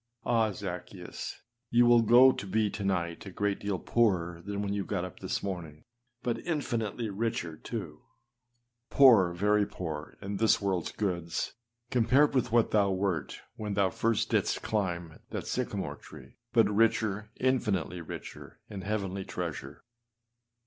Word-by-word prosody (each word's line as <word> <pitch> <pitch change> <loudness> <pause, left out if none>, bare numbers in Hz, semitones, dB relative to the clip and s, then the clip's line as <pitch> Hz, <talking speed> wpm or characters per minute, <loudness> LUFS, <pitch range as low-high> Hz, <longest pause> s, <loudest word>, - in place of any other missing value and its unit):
Ah! 110 -2 +2
Zaccheus, 90 -2 -7 0.3
you 120 +1 +5
will 120 0 +6
go 120 +4 +7
to 100 - -6
be 105 +1 +1
to 100 - -5
night 85 -4 -1
a - - -7
great 100 +1 -1
deal 100 -2 -2
poorer 90 -6 +1
than 100 +1 -3
when 100 0 -2
you 100 -1 -1
got 90 -2 -2
up 90 - -10
this - - -3
morning 90 -6 -4
â 75 - -24 0.4
but 120 -2 -1
infinitely 120 - -2
richer, 100 -6 -2
too - - -6
â 120 0 -45
poor, 115 -10 +7
very 105 +4 +2
poor, 80 -4 -6
in 100 +1 -4
this 110 +1 +4
worldâs 95 -4 -2
goods, 85 -5 -2 0.4
compared 130 +5 +4
with 125 -3 +1
what 115 -1 +3
thou 100 -2 +3
wert 95 -2 -2 0.2
when 105 -2 -3
thou 95 -2 +2
first 115 -2 0
didst - - +1
climb 85 -6 -2
that - - -4
sycamore - - -3
tree; - - -14
but - - +5
richer 105 -1 +1
infinitely 105 -9 0
richer 80 - -9
â - - -8
in 100 - -5
heavenly 100 -1 -2
treasure. 80 -6 -6
100 Hz, 155 wpm, -30 LUFS, 90-115 Hz, 0.4 s, go